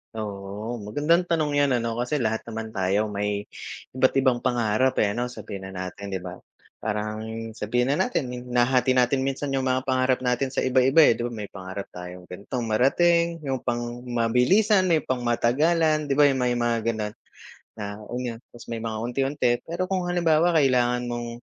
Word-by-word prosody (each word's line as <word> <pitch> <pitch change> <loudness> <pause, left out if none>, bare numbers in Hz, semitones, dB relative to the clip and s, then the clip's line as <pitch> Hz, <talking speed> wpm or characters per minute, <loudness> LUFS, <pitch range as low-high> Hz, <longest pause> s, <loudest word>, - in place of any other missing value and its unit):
Oo. 105 +2 -5
Magandang 150 - +1
tanong 160 -3 +1
'yan, 140 -2 +3
ano 115 0 -2
kasi 125 +5 -1
lahat 110 -5 0
naman 110 -1 -5
tayo 100 +2 0
may 100 0 -2 0.5
iba't-ibang 130 -1 +2
pangarap, 120 0 +1
eh, 100 - +1
'no, 120 +4 -2
sabihin 100 -5 -8
na 95 - -9 0.2
natin, 100 - -9
'di 95 -2 -4
ba. 90 0 -8 0.4
Parang 105 0 -3 0.3
sabihin 120 +4 0
na 175 +7 +2
natin, 155 - -2 0.2
nahahati 125 +1 +3
natin 125 +2 +3
minsan 135 +1 -2
yung 135 -1 0
mga 130 0 +1
pangarap 130 -1 +1
natin 125 +2 +1
sa - - 0
iba-iba, 130 +4 +5
eh,' - - -1
di 120 - -2
ba 120 - -7
may 105 -3 -6
pangarap 95 +1 -7
tayong 90 0 -9
ganitong 105 +7 -5
marating, 170 +8 +3
yung 135 -2 -2
pang-mabilisan, 125 - +2
may 160 -5 +2
pang-matagalan 150 +6 +1
'di 135 - +1
ba 145 - +5
yung 130 - -1
may 125 -1 +1
mga 120 -1 +1
gano'n 110 -2 -2 0.6
na, 105 0 -6
ayon. 120 -2 -4
'Tas 120 - -13
may 115 - -3
mga 110 -1 -3
unti-unti, 135 +2 0 0.2
pero 170 +2 -1
kung 185 -1 -2
halimbawa 170 -1 +3
kailangan 125 -3 +3
mong, 120 0 -4
125 Hz, 170 wpm, -25 LUFS, 110-140 Hz, 0.6 s, iba-iba